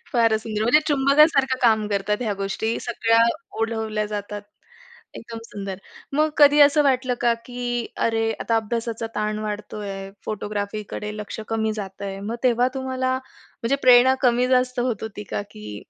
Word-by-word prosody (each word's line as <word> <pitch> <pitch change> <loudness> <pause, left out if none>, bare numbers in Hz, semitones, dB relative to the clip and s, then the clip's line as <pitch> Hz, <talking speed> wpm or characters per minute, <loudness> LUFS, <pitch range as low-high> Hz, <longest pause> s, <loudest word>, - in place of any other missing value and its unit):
फारच 230 -3 +3
सुंदर. 215 -1 -3
म्हणजे 245 +7 +5
चुंबकासारखं 275 -1 +4
काम 220 -3 +4
करतात 210 +2 -1
ह्या 220 -3 -1
गोष्टी, 200 +3 -2
सगळ्या 230 -1 +2 0.4
ओढवल्या 220 -1 -1
जातात. 205 0 -5 0.7
एकदम 230 0 -8
सुंदर. 195 -3 -6 0.4
मग 305 +2 +2
कधी 290 0 +7
असं 290 +1 +6
वाटलं 260 -2 +2
का, 240 -1 +3
की 245 -1 -3 0.2
अरे 225 0 0
आता 230 - +1
अभ्यासाचा 225 +1 -2
ताण 210 0 -1
वाढतोय, 205 -2 -5
फोटोग्राफीकडे 210 0 -4
लक्ष 210 +1 -6
कमी 220 -1 0
जातंय? 195 -1 -6
मग 220 +4 -4
तेव्हा 245 0 +3
तुम्हाला 260 -1 -1 0.5
म्हणजे 245 +4 +1
प्रेरणा 255 +1 +7
कमी 245 0 +3
जास्त 255 -1 +2
होत 240 -4 -1
होती 215 -1 -6
का? - - -2
की 105 -1 -9
225 Hz, 145 wpm, -23 LUFS, 210-250 Hz, 0.7 s, कधी